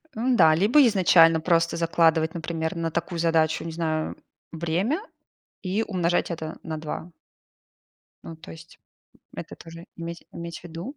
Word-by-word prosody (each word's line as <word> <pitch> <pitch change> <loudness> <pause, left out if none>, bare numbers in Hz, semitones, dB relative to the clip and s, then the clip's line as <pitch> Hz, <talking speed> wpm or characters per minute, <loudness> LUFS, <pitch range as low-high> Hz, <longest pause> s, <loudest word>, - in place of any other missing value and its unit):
М-да, 225 -9 +4
либо 235 - +5
изначально 165 -5 +5
просто 165 0 +2
закладывать, 165 -1 +2
например, 165 0 -3
на 165 -1 -2
такую 170 +1 -3
задачу, 160 -1 +1
не 165 - -5
знаю, 160 -1 -2 0.4
время 170 - -1 0.6
и 200 +3 -1
умножать 175 -3 0
это 160 -1 -6
на 160 -1 -5
2. 160 +2 -6 1.1
Ну, 165 - -8
то - - -12
есть 165 0 -14 0.6
это - - -8
тоже 165 +1 -12
иметь 170 0 -7
иметь 170 0 -8
ввиду. 175 - -8
165 Hz, 135 wpm, -25 LUFS, 160-175 Hz, 1.1 s, либо